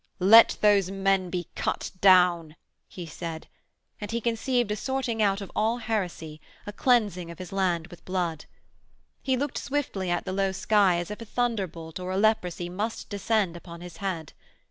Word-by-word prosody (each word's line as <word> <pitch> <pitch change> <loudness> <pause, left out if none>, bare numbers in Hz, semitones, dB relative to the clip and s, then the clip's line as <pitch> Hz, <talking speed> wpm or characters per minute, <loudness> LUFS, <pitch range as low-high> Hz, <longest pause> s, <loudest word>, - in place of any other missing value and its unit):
'Let 220 +5 +7
those 205 -3 +4
men 195 -1 +1
be 175 -2 -3
cut - - -3
down,' 180 -4 +5 0.3
he 180 - -8
said, 160 0 -7 0.5
and 205 - -6
he 235 - -1
conceived 235 0 0
a - - 0
sorting 255 -1 -2
out 200 -1 +2
of 195 - -8
all 225 +2 +1
heresy, 180 -9 -4 0.2
a 205 - -6
cleansing 205 -8 +1
of 170 - -9
his 185 +1 -8
land 180 -4 0
with 175 - -14
blood. 175 -4 -2 0.8
He 260 -1 0
looked 285 +1 -2
swiftly 255 -10 -2
at 175 0 -1
the 185 - -3
low 195 0 0
sky 195 -2 +3
as 175 +3 -4
if 210 - -7
a - - -6
thunderbolt 190 -9 -3
or 180 0 -5
a 185 - -1
leprosy 190 -5 +1
must 205 +6 -4
descend 205 -3 0
upon 170 0 -10
his 175 -2 -10
head. 175 -6 -4
195 Hz, 175 wpm, -26 LUFS, 175-220 Hz, 0.8 s, Let